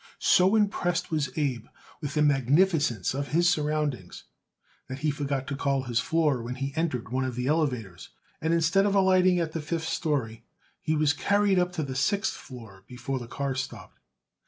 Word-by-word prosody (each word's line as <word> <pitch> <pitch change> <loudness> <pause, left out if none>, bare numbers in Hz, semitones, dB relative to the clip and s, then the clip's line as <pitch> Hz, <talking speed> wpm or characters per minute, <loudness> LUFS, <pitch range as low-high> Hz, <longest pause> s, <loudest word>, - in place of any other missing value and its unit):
So 185 +4 +4
impressed 175 -6 0
was 150 -4 0
Abe 130 -6 -1 0.3
with 145 -2 -5
the 150 - +3
magnificence 145 - +2
of 140 +1 -3
his 170 +4 +2
surroundings 150 - -1 0.6
that 130 - -6
he 150 - +3
forgot 140 -2 -3
to 140 - -4
call 135 -1 0
his 120 -2 0
floor 150 -4 +1
when 120 +2 -5
he 135 +1 -4
entered 155 -9 -2
one 130 +2 -1
of 130 -2 -3
the 125 0 -3
elevators, 125 - -1 0.3
and 160 - 0
instead 170 +4 +3
of 200 - 0
alighting 185 -2 +4
at 165 -2 -1
the 160 - -4
fifth 160 +1 -3
story 140 -9 -2 0.4
he 155 - 0
was 150 -1 +2
carried 200 +3 +2
up 180 0 0
to 160 - -2
the 135 -2 -5
sixth 200 +10 +1
floor 110 -8 -12
before 130 +2 -4
the 120 - -8
car 140 +2 -3
stopped. 130 - -7
145 Hz, 180 wpm, -27 LUFS, 130-165 Hz, 0.6 s, So